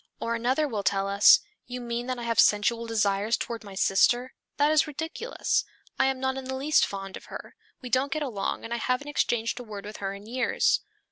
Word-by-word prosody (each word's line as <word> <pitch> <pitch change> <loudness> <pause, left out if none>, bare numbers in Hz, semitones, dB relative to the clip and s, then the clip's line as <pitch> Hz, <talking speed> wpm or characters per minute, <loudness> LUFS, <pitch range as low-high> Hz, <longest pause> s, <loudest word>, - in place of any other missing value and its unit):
Or 230 - -2
another 255 +6 +1
will 220 -7 -3
tell 195 0 +1
us, 200 +1 +7 0.3
"You 250 0 -5
mean 240 0 -4
that 255 -1 -2
I 240 - -6
have 230 -1 0
sensual 230 +3 +3
desires 210 0 +1
toward 230 -1 -5
my 200 -2 -10
sister? 240 +7 +2 0.2
That 290 +1 +3
is 310 0 +4
ridiculous. 320 - -2 0.4
I - - +4
am 265 -1 -1
not 265 0 -1
in 265 - -6
the 265 0 -4
least 290 +4 +3
fond 195 -1 -6
of - - -14
her. - - -9 0.3
We 250 - -6
don't 265 +4 +1
get 310 +1 -1
along 215 -8 -3
and 230 - -4
I - - -1
haven't 255 +5 -1
exchanged 235 -5 0
a - - -6
word 210 -3 -8
with 210 +1 -8
her 195 0 -4
in 200 +1 -12
years." 250 +4 +1
235 Hz, 220 wpm, -27 LUFS, 210-265 Hz, 0.4 s, us